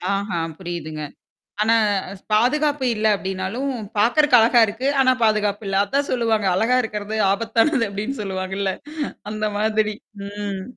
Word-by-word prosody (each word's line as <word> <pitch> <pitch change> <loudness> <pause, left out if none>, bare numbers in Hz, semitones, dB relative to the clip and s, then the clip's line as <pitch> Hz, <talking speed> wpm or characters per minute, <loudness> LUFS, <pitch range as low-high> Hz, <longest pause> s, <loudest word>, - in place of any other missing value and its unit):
ஆஹா, 195 -4 -2 0.2
புரியுதுங்க. 165 -4 -6 0.6
ஆனா, 225 +2 +4 0.3
அ - - -7 0.2
பாதுகாப்பு 285 +5 +2
இல்ல 215 +1 +1
அப்டினாலும், 195 +8 -3 0.3
பார்க்கறக்கு 245 +5 +4
அழகா 235 +2 +5
இருக்கு. 225 +6 -3
ஆனா 260 - +5
பாதுகாப்பு 210 -1 +1
இல்ல. 195 - -1
அதான் 280 +7 -1
சொல்லுவாங்க. 225 -4 +1
அழகா 230 +6 +2
இருக்கிறது 210 -1 -4 0.2
ஆபத்தானது 230 +6 +1
அப்டின்னு 215 +7 -4
சொல்லுவாங்கல்ல! 190 0 -2 0.6
அந்த 215 0 -2
மாதிரி. 215 0 +1 0.3
ம். 200 -1 -5
215 Hz, 130 wpm, -22 LUFS, 200-240 Hz, 0.6 s, அழகா